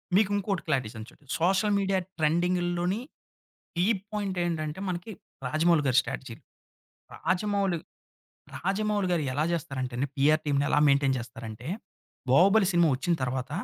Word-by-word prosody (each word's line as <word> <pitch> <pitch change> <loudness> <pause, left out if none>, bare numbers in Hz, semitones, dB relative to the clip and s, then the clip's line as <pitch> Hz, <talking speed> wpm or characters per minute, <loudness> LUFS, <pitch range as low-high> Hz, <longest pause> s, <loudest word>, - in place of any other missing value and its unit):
మీకు 205 0 +4
ఇంకోటి 200 -2 -1
క్లారిటీ 130 -5 +1
ఇస్తాను 110 0 -9
చూడు. 145 - -22
సోషల్ 190 +5 +2
మీడియా 195 -1 +1 0.2
ట్రెండింగ్‌ 175 +4 +2 0.2
లోని 180 +5 0 0.8
కీ 175 +1 +2 0.3
పాయింట్ 200 -3 -2
ఏంటంటే, 155 -1 -2
మనకి 180 +4 -4 0.4
రాజమౌళి 155 +3 +3
గారి 130 - +3
స్ట్రాటజీ. 125 -3 -6 0.8
రాజమౌళి. 195 -1 0 0.8
రాజమౌళి 205 +1 0
గారు 170 - +1
ఎలా 145 +4 0
జేస్తారంటే 135 -7 -3
అండీ 135 +3 -1
పిఆర్ 150 +3 +4
టీమ్‌ని 140 -1 +1
ఎలా - - +4
మెయింటైన్ 140 -1 +3
జేస్తారంటే, 115 0 -8 0.6
'బాహుబలి' 195 +7 +5
సినిమా 170 -1 +4
వచ్చిన 135 +7 0
తర్వాత 130 +1 -2
170 Hz, 135 wpm, -28 LUFS, 135-190 Hz, 0.8 s, బాహుబలి